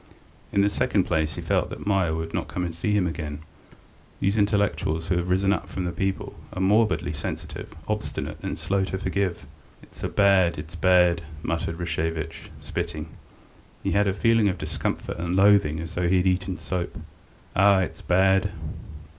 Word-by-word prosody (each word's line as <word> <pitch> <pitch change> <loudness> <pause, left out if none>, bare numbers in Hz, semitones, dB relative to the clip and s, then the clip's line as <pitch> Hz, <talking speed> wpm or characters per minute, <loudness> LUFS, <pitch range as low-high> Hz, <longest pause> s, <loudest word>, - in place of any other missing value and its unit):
In 100 - +3
the 100 - +4
second 100 -1 +2
place 80 -3 0
he - - -5
felt - - +1
that - - -7
Meier 95 -6 +2
would 80 0 -4
never - - -2
come 90 - -2
and 85 -2 -5
see 95 +5 -1
him 105 -3 +3
again. 80 -3 -4 0.8
These 100 +2 +1
intellectuals 100 -6 +1
who 90 - +2
have 90 +1 -1
risen 95 +2 +3
from 95 - -4
the 90 - -1
people 95 +2 -2 0.2
are - - -5
morbidly 105 -4 +2
sensitive, 75 +1 -6
obstinate 105 0 -3
and - - -3
slow 95 0 0
to 95 - -3
forgive. 95 -5 -1 0.4
"It's - - -13
bad, 95 -5 +3
it's 80 +3 -8
bad," 90 -1 +4 0.2
muttered 85 0 -2
Rashevitch, 80 -1 -3
spitting; 75 +1 -4 0.7
he - - 0
had 100 0 +3
a 95 - +2
feeling 115 -2 +4
of 90 - -2
discomfort - - -3
and 85 +1 -1
loathing 95 -6 +5
as 80 +1 -6
though 90 0 0
he 95 - +4
had 90 - +2
eaten 95 0 0
soap. 90 -2 -3 0.6
"Ah, 100 0 +5
it's 90 - -4
bad!" 95 +2 +3
90 Hz, 170 wpm, -25 LUFS, 85-100 Hz, 0.8 s, loathing